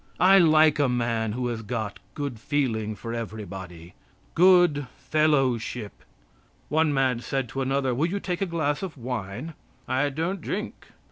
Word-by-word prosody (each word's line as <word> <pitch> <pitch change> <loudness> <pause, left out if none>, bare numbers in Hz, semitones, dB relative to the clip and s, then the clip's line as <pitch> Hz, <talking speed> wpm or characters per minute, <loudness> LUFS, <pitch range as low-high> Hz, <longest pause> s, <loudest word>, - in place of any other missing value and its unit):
I 195 +1 +7
like 155 -2 +5
a 140 -3 +3
man 115 -3 0
who 125 +2 -2
has 115 -2 -3
got 110 -1 -4 0.2
good 140 -6 -4
feeling 110 -6 -1
for 115 +3 -6
everybody 95 -6 -7 0.4
good 175 -6 +5
fellowship. 130 -6 +1 0.8
One 155 +1 +2
man 130 -4 +1
said 135 +1 -2
to 135 - -3
another: 135 -1 0
"Will 145 +7 +1
you 200 +4 -2
take 180 -2 -3
a 195 - +1
glass 155 -4 -1
of 185 -6 -6
wine?" 120 +4 -5 0.3
"I 130 +3 +1
don't 165 +6 -3
drink." 210 +5 -5
135 Hz, 150 wpm, -26 LUFS, 115-155 Hz, 0.8 s, I